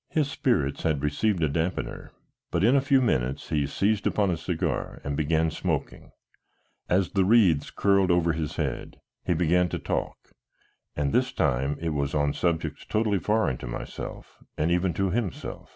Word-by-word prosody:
His 150 -3 0
spirits 70 - 0
had 75 -3 0
received 85 +5 +1
a - - +4
dampener, 80 +5 -3 0.4
but 85 - 0
in 120 +6 +5
a 140 - +4
few 135 -1 +3
minutes 65 - -1
he 75 -2 +1
seized 105 +6 0
upon 100 -3 +1
a - - 0
cigar 80 +1 -3
and 70 0 -2
began 80 +2 +1
smoking; - - -3 0.8
as 90 +1 +2
the 95 -1 +2
wreaths 95 -7 +4
curled 100 -2 +2
over 85 -1 +3
his 80 -1 -3
head - - -4 0.2
he 90 - 0
began 90 +2 +2
to - - -3
talk, - - -4 0.6
and 70 -2 -1
this - - +2
time 65 +3 0
it 85 - -2
was 70 -2 -1
on 75 -1 +1
subjects 80 -3 -1
totally 110 -2 0
foreign 105 - 0
to - - -7
myself - - -7 0.2
and 80 +3 +1
even 90 +1 +2
to 95 +1 0
himself. 105 -4 -4
85 Hz, 170 wpm, -26 LUFS, 75-100 Hz, 0.8 s, in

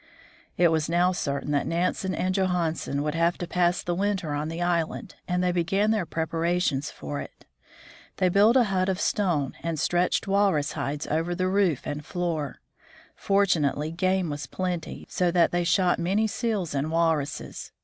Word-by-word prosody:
It 175 -1 +5
was 160 -1 0
now 175 +2 +3
certain 140 -5 -2
that 145 -1 +1
Nansen 180 +2 -1
and 185 0 0
Johansen 175 -6 0
would 150 0 -1
have 170 +1 +1
to 175 - -4
pass 175 0 +1
the 175 - -1
winter 190 -4 -1
on 150 +1 -2
the 165 +1 -5
island, 175 +3 -1
and 180 0 0
they 180 - +2
began 195 +5 +1
their 210 -6 0
preparations 165 -3 0
for 145 -1 -6
it. - - -12 0.7
They 185 - +3
built 205 +7 +5
a 255 - +6
hut 190 -3 0
of 190 0 -1
stone, 170 - 0
and 165 -2 -2
stretched 175 +6 +1
walrus 195 -7 +2
hides 145 -1 -3
over 165 +3 -1
the 185 +1 0
roof 185 -7 +1
and 150 +1 -4
floor. 165 -4 -3 0.5
Fortunately 160 -7 +1
game 185 0 0
was 145 -1 -5
plenty, 180 +2 -4
so 180 -1 0
that 170 -1 +3
they 175 0 +1
shot 180 +1 +2
many 195 +6 +1
seals 210 - -2
and 140 +2 -1
walruses. 160 -3 -1
175 Hz, 170 wpm, -26 LUFS, 155-185 Hz, 0.7 s, a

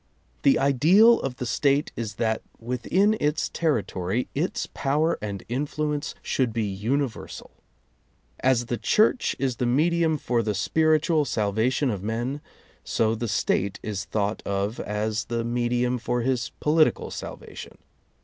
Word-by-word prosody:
The 140 - +5
ideal 170 - +5
of 135 -2 -3
the 125 - -5
State 140 +4 +1
is 110 -3 -4
that 110 -1 0 0.2
within 125 - +1
its 150 +2 0
territory 115 - -1
its 160 +6 -2
power 150 +4 +1
and 100 -3 -5
influence 145 +3 -2
should 130 -3 0
be 115 -1 0
universal. 110 +6 -3 0.9
As 130 -2 +2
the 120 0 -3
Church 225 +3 +2
is 130 -2 -1
the 125 - 0
medium 160 +4 +2
for 120 -4 0
the 105 -2 -2
spiritual 155 - +2
salvation 115 +3 0
of 100 -4 -4
men, 120 +7 -3 0.4
so 110 -1 +1
the 115 +1 -3
State 100 -2 0
is 100 -2 -3
thought 105 0 -1
of 100 +3 -2
as 105 +2 -2
the 115 -1 -2
medium 120 +1 0
for 120 +1 -1
his 120 -1 0
political 155 +1 +2
salvatio|n. - - -8
125 Hz, 140 wpm, -25 LUFS, 110-150 Hz, 0.9 s, The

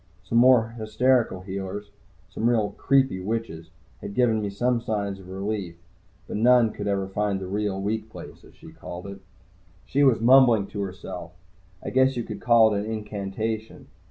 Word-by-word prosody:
The - - -5
more 120 -1 +5
hysterical 110 -2 +1
healers, 100 +2 -6 0.4
some 110 +4 -1
really 110 -4 +1
creepy 135 -8 +2
witches, 95 -5 -4 0.3
had 100 - -8
given 115 -3 +2
me 105 - -2
some 120 +4 0
signs 100 -3 -3
of 95 -1 -13
relief, 95 -2 -4 0.5
but - - -4
none 120 0 +4
could 105 0 -6
ever 100 -1 -1
find 100 0 -1
the 95 - -6
real 100 0 -2
"weak 110 +2 -3
place," - - -11
as - - -18
she - - -14
called 90 +1 -9
it. 100 0 -8 0.7
She 140 +2 +1
was 130 -5 +4
mumbling 120 -3 +5
to 100 - -5
herself. 90 -2 -7 0.5
I - - -4
guess 130 0 +3
you 120 - -1
could - - -8
call 115 -2 +5
it 100 - 0
an 110 - -5
incantation. 110 +1 -5
105 Hz, 175 wpm, -25 LUFS, 95-115 Hz, 0.7 s, more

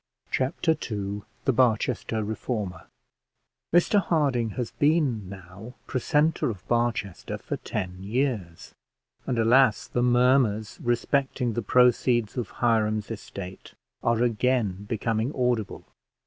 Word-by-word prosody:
Chapter 135 +5 +1 0.2
II 100 -1 -3 0.2
THE 135 - +3
BARCHESTER 115 -2 +1
REFORMER 105 -4 -4 0.8
Mr 175 +4 +4
Harding 140 -10 +1
has 120 -3 -2
been 145 - +1
now 100 +5 -11
precentor 150 +5 +1
of 100 -5 -7
Barchester 115 -6 -1
for - - -5
ten 90 0 -5
years; 105 -6 -2 0.5
and, 125 - 0
alas, 115 0 +4
the 120 - -1
murmurs 120 -3 +2
respecting 125 0 0
the 120 - -1
proceeds 120 -1 +3
of 120 -4 -3
Hiram's 110 -3 0
estate 100 -3 -8 0.3
are 115 0 +2
again 115 -4 0
becoming 115 +2 -1
audible. 125 -4 -1
115 Hz, 110 wpm, -26 LUFS, 105-125 Hz, 0.8 s, Mr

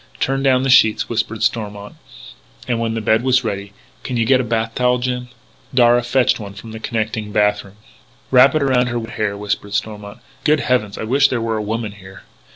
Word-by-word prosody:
"Turn 135 0 0
down 130 -1 +3
the 135 - +2
sheets," 110 -4 +4
whispered 115 -1 -2
Stormont. 105 -2 -2 0.7
And, 120 -2 -1
when 115 -1 -2
the 115 - -2
bed 110 +1 +2
was 130 0 +2
ready: 100 -2 -4 0.3
"Can 125 - -4
you 115 - +1
get 130 +1 +4
a - - -3
bath 115 -1 -2
towel, 125 0 +2
Jim?" 125 0 -3 0.5
Darragh 120 -1 +4
fetched 125 0 +2
one 100 -2 -8
from 110 +2 -10
the 110 - -8
connecting 110 -2 -3
bath 105 0 +1
room. 100 0 -16 0.6
"Wrap 130 +3 +6
it 155 - +2
around 130 -2 +2
her 120 0 -2
wet 115 -1 -6
hair," 105 -2 -2
whispered 105 0 -3
Stormont. 105 -1 -4 0.3
"Good 150 -1 +3
heavens, 115 -5 0
I - - -5
wish 135 +5 +3
there 130 -3 -2
were 115 -1 -2
a - - -2
woman 110 0 -3
here." 95 -3 -14
115 Hz, 210 wpm, -19 LUFS, 105-125 Hz, 0.7 s, Wrap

